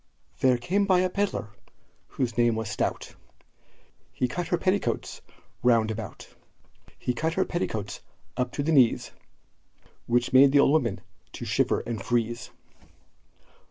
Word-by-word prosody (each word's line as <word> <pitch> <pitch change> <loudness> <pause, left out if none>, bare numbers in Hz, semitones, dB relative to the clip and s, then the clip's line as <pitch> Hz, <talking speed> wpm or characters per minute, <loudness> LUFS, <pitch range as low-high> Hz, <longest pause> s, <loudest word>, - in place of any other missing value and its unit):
There 130 -2 +4
came 190 +12 0
by 185 -2 +4
a 185 0 0
pedlar, 200 - -2 0.6
whose 120 -3 -3
name 120 -1 +3
was 110 -2 -3
Stout, - - -2 1.0
He 125 - -1
cut 170 +7 -4
her 175 - +1
petticoats 190 +3 -1 0.4
round 115 -3 +3
about; 110 0 -7 0.7
He 125 - -2
cut 160 +6 -2
her 190 - +2
petticoats 110 - -3 0.3
up 125 -1 -1
to 145 - -2
the 160 - 0
knees, 130 -7 +3 1.0
Which 120 +1 +1
made 135 +1 +7
the 145 - +6
old 140 - +5
woman 125 -10 +1 0.3
to - - -6
shiver - - +1
and 110 -4 -5
freeze. 120 -1 -1
125 Hz, 140 wpm, -26 LUFS, 115-165 Hz, 1.0 s, made